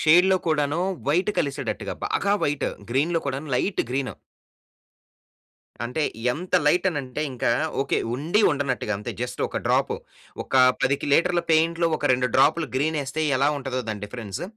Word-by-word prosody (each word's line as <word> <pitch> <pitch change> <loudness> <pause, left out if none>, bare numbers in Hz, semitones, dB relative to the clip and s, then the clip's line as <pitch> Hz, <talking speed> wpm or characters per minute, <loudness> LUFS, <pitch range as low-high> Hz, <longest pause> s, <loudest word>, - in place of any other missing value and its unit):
షేడ్‌లో 180 +4 +5
కూడాను 155 +1 +1 0.3
వైట్ 180 +8 +2
కలిసేటట్టుగా 140 -1 -2
బాగా 200 - 0
వైట్. 145 -1 0 0.2
గ్రీన్‌లో 160 +7 +1
కూడాను 140 +2 -3
లైట్ 195 - 0
గ్రీను. 135 0 -2 1.7
అంటే, 125 +6 -2 0.3
ఎంత 180 +8 -5
లైటనంటే 150 -5 +1
ఇంకా, 120 -1 0 0.3
ఓకే, 135 - 0 0.2
ఉండి 160 - +1
ఉండనట్టుగా 135 -7 -1
అంతే. 105 - -5
జస్ట్ 125 - -5
ఒక - - -3
డ్రాపు. - - +2 0.5
ఒకా 130 - +3 0.2
10కి 140 +2 +1
లీటర్ల 175 +1 +2
పెయింట్‌లో 165 +1 +3
ఒక 145 - +1
2 125 0 +1
డ్రాపులు 155 +2 +3
గ్రీనేస్తే 150 +1 -1 0.2
ఎలా 140 +2 +3
ఉంటదో 130 -2 -3
దాని 105 -1 -5
డిఫరెన్స్ 105 - -6
145 Hz, 135 wpm, -24 LUFS, 130-165 Hz, 1.7 s, షేడ్‌లో